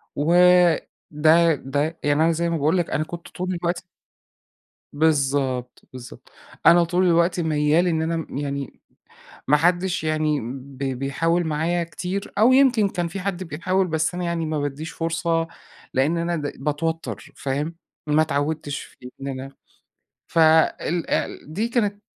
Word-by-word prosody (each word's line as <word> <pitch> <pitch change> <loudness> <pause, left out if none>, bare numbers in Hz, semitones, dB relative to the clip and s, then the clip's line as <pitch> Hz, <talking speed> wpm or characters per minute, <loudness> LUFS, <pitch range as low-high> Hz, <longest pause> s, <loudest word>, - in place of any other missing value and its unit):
وده 165 -1 +3
ده 145 +4 -2
يعني 145 +2 +2
أنا 165 - +4
زي 170 +1 -1
ما 165 - 0
باقول 155 +5 +2
لك 175 -2 -1
أنا 155 - 0
كنت 170 +2 -9
طول 185 +1 -4
الوقت 175 0 -2 1.1
بالضبط 140 -4 0
بالضبط 130 -1 -11 0.3
أنا 170 0 +7
طول 175 +2 +1
الوقت 170 +1 +2
ميّال 155 +1 +2
إن 160 -2 +1
أنا 165 +1 -1
م 160 -4 -6
يعني 140 -2 -4 0.7
ما 150 - +5
حدّش 175 +2 +1
يعني 155 -1 0
ب 130 +3 -8
بيحاول 140 +6 -1
معايا 165 +3 0
كتير، 180 +5 -5
أو 225 +5 +5
يمكن 255 -6 +4
كان 175 -2 -2
في 175 +4 -6
حد 190 -1 -3
بيحاول 185 +4 -1
بس 160 0 0
أنا 180 - -3
يعني 170 -1 -1
ما 155 -1 -2
بادّيش 145 +3 -4
فرصة، 165 0 -1 0.5
لإن 145 +5 +2
أنا 170 +1 -1
د 145 -3 -3
باتوتر 160 +3 -3
فاهم؟ 145 +4 -3 0.3
ما 150 +1 +3
اتعودتش 145 -1 -1
في 125 0 -13
إن 135 - -5
أنا 135 0 -6 0.8
ف - - -3
ال 160 +1 +3
ال 150 - -2
دي 215 +8 -1
كانت 210 -4 -1
160 Hz, 150 wpm, -23 LUFS, 145-175 Hz, 1.1 s, أنا